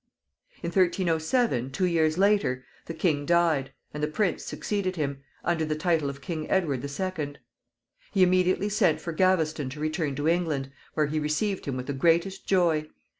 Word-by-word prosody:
In 170 - -1
1307, 170 - +1
two 185 +7 0
years 160 -2 +2
later, 195 - +2 0.2
the 165 - -4
king 155 -3 +1
died, 165 -4 +2 0.2
and 150 - -5
the 150 - +1
prince 180 +4 0
succeeded 195 -3 -2
him, 140 -4 -3 0.2
under 170 -2 +1
the 155 0 -1
title 160 -3 +1
of 140 0 -8
King 155 +1 -4
Edward 150 -9 +1
the 140 - -4
Second. 150 -1 -4 0.7
He 195 -2 +4
immediately 185 +2 +3
sent 190 -7 +2
for 170 - -5
Gaveston 160 -5 +2
to 145 +3 -8
return 155 -2 -1
to 145 +2 -1
England, 160 -6 0 0.2
where 155 - +3
he 155 +1 -1
received 155 +7 -1
him 135 -2 -3
with 125 - -4
the 140 - -3
greatest 170 +7 +1
joy. 170 -5 +2
160 Hz, 175 wpm, -27 LUFS, 150-185 Hz, 0.7 s, He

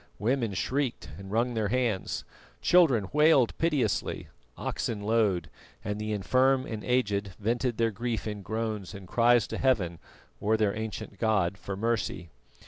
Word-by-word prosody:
Women 115 -2 0
shrieked 130 - -1
and 95 0 -9
wrung 120 +4 +1
their 110 -2 0
hands, 115 -4 -1 0.4
children 135 - +4
wailed 150 -5 +5
piteously, 145 -10 0 0.3
oxen 105 -3 -3
lowed, 105 -4 +2 0.4
and 105 +1 -3
the 110 0 -3
infirm 130 +6 +2
and 110 -2 -5
aged 100 -6 0
vented 120 +3 0
their 115 -1 +2
grief 115 +2 -3
in 105 -2 -4
groans 105 -2 -3
and 95 -2 -10
cries 120 +2 +4
to - - -5
Heaven, 95 -11 +1 0.4
or 110 +2 +2
their 105 -2 +1
ancient 110 -2 -6
god, 100 -5 +2
for 95 +1 -6
mercy. 110 -6 -2
110 Hz, 145 wpm, -28 LUFS, 100-120 Hz, 0.4 s, wailed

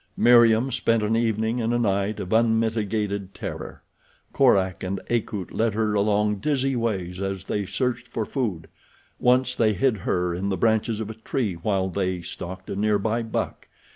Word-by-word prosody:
Meriem 120 +1 +5
spent 115 -2 +1
an 110 +2 +1
evening 115 +1 0
and 115 +1 0
a - - +3
night 100 -2 0
of 95 - -4
unmitigated 110 -3 0
terror. - - -7 0.5
Korak 95 -9 +3
and 95 +1 -2
Akut 105 -5 -2
led 110 -2 0
her 110 -1 +1
along 105 0 +2
dizzy 135 +2 0
ways 95 -6 -2
as 95 -1 -3
they 100 -1 -2
searched 125 +1 -2
for 115 -2 -3
food. 100 - -3 0.5
Once 125 0 +3
they 110 -3 +3
hid 130 +1 +1
her 90 -1 -1
in 95 +3 -2
the 95 - -1
branches 110 +2 +1
of 110 0 -4
a 110 0 -14
tree 110 -5 -1
while 95 +2 -1
they 95 -2 -2
stalked 95 +2 -7
a - - -3
near 105 +1 +2
by 110 +3 -1
buck. 115 -1 -4
110 Hz, 170 wpm, -24 LUFS, 95-115 Hz, 0.5 s, Meriem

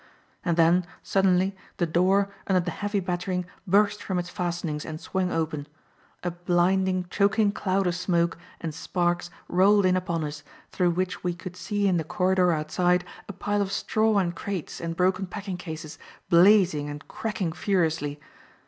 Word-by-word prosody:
And 170 -2 0
then 170 +2 +5 0.2
suddenly, 190 0 +2 0.2
the 175 - +2
door, 190 +4 +2
under 190 -2 +3
the 175 0 -3
heavy 205 +3 -2
battering, 180 0 -2 0.2
burst 205 +2 +3
from 190 - -2
its 175 0 -2
fastenings 170 -4 -3
and 155 -1 -6
swung 185 0 -2
open. 155 -3 -2 0.6
A 175 - -1
blinding, 180 +2 +1
choking 205 +1 +3
cloud 195 -1 0
of 175 - +1
smoke 170 -1 +1 0.2
and 160 -2 -4
sparks 175 +2 -1 0.2
rolled 195 +2 +4
in 185 0 +4
upon 170 -3 -1
us, 150 0 -5 0.3
through 180 -1 +2
which 185 +3 -2
we 175 -1 -1
could 180 0 -8
see 205 +2 -1
in 185 -2 +3
the 160 - 0
corridor 185 +1 +2
outside 175 +3 +1 0.2
a - - -4
pile 205 +2 -1
of 195 -1 -1
straw 215 +1 +1
and 175 -3 +1
crates 190 -2 -5
and 165 -1 -3
broken 185 +1 +1
packing 195 0 -5
cases, 160 -3 -7 0.3
blazing 175 -4 +5
and 145 +1 -8
cracking 195 -7 -3
furiously. 160 -6 0
180 Hz, 165 wpm, -26 LUFS, 170-195 Hz, 0.6 s, then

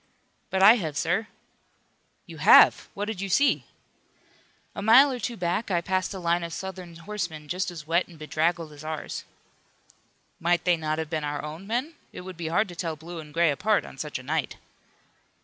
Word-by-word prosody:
"But 190 0 +1
I 220 +5 +9
have, 155 -8 -4
sir." 175 +8 0 1.0
"You - - -11
have! - - +6
What 205 - -2
did 210 -3 -5
you 195 - -3
see?" 280 +9 +3 1.1
"A - - -6
mile 250 +7 +7
or 250 - -4
two 235 +1 -4
back 180 +5 -1
I 175 -3 +2
passed 185 +2 -1
a 195 - -5
line 170 0 +1
of 170 -1 -5
Southern 185 -3 -7
horsemen, 170 -4 -5
just 180 +4 -2
as 165 -4 -9
wet 170 +3 +1
and 170 - -15
bedraggled 160 +1 -1
as 145 0 -12
ours." 155 0 -5 1.1
"Might 175 +1 +1
they 180 -1 +4
not 155 -1 -2
have 160 0 -4
been 155 -2 -2
our 145 -1 -3
own 160 +6 -8
men? 250 +8 -2 0.2
It - - -8
would 185 0 -9
be 165 -1 -5
hard 175 +6 +1
to 175 - -9
tell 165 -2 -3
blue 165 +3 -9
and 150 -1 -10
gray 165 0 +3
apart 205 +10 +1
on - - -12
such - - -4
a - - -10
night." - - -2
175 Hz, 200 wpm, -26 LUFS, 160-195 Hz, 1.1 s, I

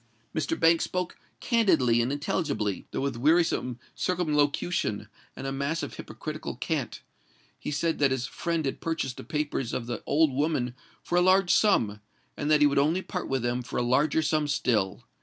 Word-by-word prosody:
Mr. 155 +1 -1
Banks 165 0 +4
spoke 180 -1 -3 0.2
candidly 135 - +3
and 120 +3 0
intelligibly—though 140 - -2
with 135 -3 -2
wearisome 150 -3 +2 0.2
circumlocution 150 - 0 0.3
and - - -7
a 135 - -2
mass 140 +4 -2
of - - -5
hypocritical - - -6
cant. - - -3 0.6
He - - -5
said 160 +3 0
that 140 -1 +4
his 130 -1 -1
friend 165 0 -2
had 135 - -3
purchased 160 -6 -2
the - - -7
papers 145 -5 -2
of 120 - -2
the 120 -2 -4
old 155 +1 +3
woman 135 -3 0 0.3
for 175 - +1
a - - +4
large 185 0 +4
sum; 110 - +3 0.3
and 145 - -3
that 150 -1 +5
he - - +7
would 140 -1 +3
only 160 +6 +2
part 180 - -4
with 135 -2 0
them 120 +1 0
for 120 - -6
a 125 - +1
larger 140 +6 +2
sum 155 -1 +1
still. 110 -9 0
145 Hz, 175 wpm, -27 LUFS, 125-165 Hz, 0.6 s, he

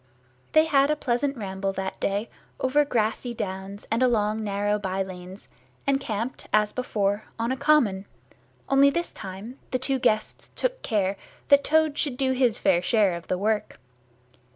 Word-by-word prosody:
They 310 0 +6
had 280 -3 +3
a 300 - +3
pleasant 275 0 -1
ramble 195 -2 -3
that 190 0 -4
day 200 +3 -1 0.3
over 275 +3 +3
grassy 235 -1 -1
downs 195 0 -5
and 230 +2 +1
along 220 -3 +2
narrow 205 0 0
by 195 -1 -1
lanes, 185 +1 -10 0.4
and 275 -1 +2
camped 225 +3 -4
as 210 0 +3
before, 210 -4 -1
on 230 +2 -1
a - - +1
common, 260 -9 +2 0.6
only 275 +1 +5
this 340 +4 -2
time 200 +6 -8
the 255 - 0
two 265 +1 0
guests 215 -3 0
took - - -1
care 200 -3 0 0.3
that 280 0 +6
Toad 315 -1 +2
should 270 -5 -1
do 265 -1 +1
his 250 -4 +2
fair 180 -3 +3
share 205 -1 +3
of 170 0 -9
work. 210 +4 -1
220 Hz, 160 wpm, -26 LUFS, 200-270 Hz, 0.6 s, They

